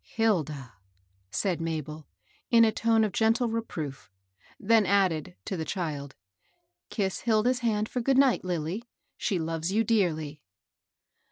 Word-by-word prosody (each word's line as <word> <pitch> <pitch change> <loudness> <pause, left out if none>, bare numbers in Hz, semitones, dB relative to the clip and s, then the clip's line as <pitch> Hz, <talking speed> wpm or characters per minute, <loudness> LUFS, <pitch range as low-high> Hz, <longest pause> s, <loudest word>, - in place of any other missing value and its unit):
" - - -47
Hilda! 155 - -1 0.3
" 95 0 -41
said 180 - -1
Mabel, 155 -2 -4 0.4
in 230 -1 +6
a 220 - +3
tone 225 0 +2
of 215 - 0
gentle 225 +4 +2
re 230 +1 -1
proof; 150 -10 -7 0.5
then 225 +1 +4
added, 180 - +1
to - - -3
the 160 - -3
child, 150 -4 -4 0.7
^^Eiss 195 -4 -2
Hil 220 -2 +2
da's 250 +1 +2
hand 215 -3 0
for 250 - -3
good 265 +2 +2
night, 270 -2 +4
Lilly. 180 +4 -3 0.3
She 200 -5 -1
loves 165 +1 -2
you 220 +3 +2
dearly." 160 -9 0
190 Hz, 155 wpm, -28 LUFS, 155-225 Hz, 0.7 s, in